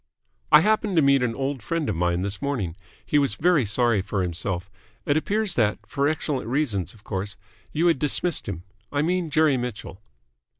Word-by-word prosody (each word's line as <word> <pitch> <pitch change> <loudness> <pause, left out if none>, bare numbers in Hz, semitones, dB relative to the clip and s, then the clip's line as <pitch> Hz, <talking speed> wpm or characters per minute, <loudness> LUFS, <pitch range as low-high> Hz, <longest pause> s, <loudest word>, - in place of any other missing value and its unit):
"I 150 - +9
happened 215 0 +1
to 160 - +5
meet 140 -1 +4
an 120 -2 0
old 135 -1 -2
friend 165 +6 -2
of - - -1
mine 85 +1 0
this 100 0 -4
morning. 120 -13 -2 0.3
He 150 - +3
was 140 -7 +1
very 155 -7 +3
sorry 115 -1 +2
for 100 -1 -2
himself. 90 +2 -3 0.3
It 145 - +2
appears 205 +5 0
that 110 -7 +2
for 140 0 0
excellent 145 -5 -1
reasons, 115 - -1
of 105 - -20
course 100 0 -4 0.3
you 160 +3 0
had 165 -6 +3
dismissed 155 - 0
him. 90 -3 -5 0.3
I 145 0 +1
mean 175 0 0
Jerry 155 -3 +3
Mitchell." 115 -5 -6
135 Hz, 185 wpm, -24 LUFS, 100-155 Hz, 0.3 s, I